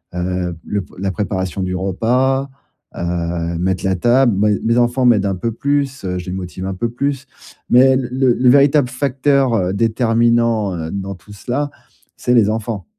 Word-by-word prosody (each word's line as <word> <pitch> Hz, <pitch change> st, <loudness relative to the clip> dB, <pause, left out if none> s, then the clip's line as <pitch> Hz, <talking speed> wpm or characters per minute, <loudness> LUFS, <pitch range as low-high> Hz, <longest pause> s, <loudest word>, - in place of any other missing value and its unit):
heu, 90 Hz, -1 st, -2 dB
le 105 Hz, -1 st, -2 dB
p -, -, -14 dB
la 95 Hz, 0 st, -1 dB
préparation 95 Hz, -1 st, -3 dB
du 90 Hz, 0 st, -2 dB
repas, 125 Hz, +9 st, 0 dB, 0.5 s
heu, 85 Hz, -1 st, -2 dB
mettre 95 Hz, +1 st, -1 dB
la 95 Hz, 0 st, +1 dB
table. 120 Hz, +4 st, +3 dB
Moi 105 Hz, +1 st, +3 dB
et 100 Hz, -, 0 dB
mes 115 Hz, +1 st, +2 dB
enfants 120 Hz, +1 st, +2 dB
m'aident 110 Hz, -5 st, +4 dB
un 95 Hz, -, -1 dB
peu 115 Hz, +6 st, -3 dB
plus, 140 Hz, -1 st, -1 dB
heu, 90 Hz, 0 st, -2 dB
je 90 Hz, -, -8 dB
les 90 Hz, -, -4 dB
motive 95 Hz, 0 st, -6 dB
un 95 Hz, -, -3 dB
peu 115 Hz, +6 st, -2 dB
plus 140 Hz, +3 st, -3 dB, 0.4 s
mais 130 Hz, +2 st, +6 dB
l 130 Hz, -2 st, 0 dB
le 130 Hz, -1 st, +2 dB
le 125 Hz, +1 st, +3 dB
véritable 140 Hz, 0 st, +4 dB
facteur, 135 Hz, 0 st, +1 dB
heu, 95 Hz, -3 st, 0 dB
déterminant, 115 Hz, -1 st, +1 dB
heu, 80 Hz, 0 st, -5 dB
dans 100 Hz, -1 st, -5 dB
tout 105 Hz, +3 st, -17 dB
cela, 130 Hz, +8 st, -3 dB, 0.5 s
c'est 125 Hz, -, 0 dB
les 110 Hz, -4 st, +4 dB
enfants. 110 Hz, -1 st, -3 dB
115 Hz, 190 wpm, -18 LUFS, 95-130 Hz, 0.5 s, mais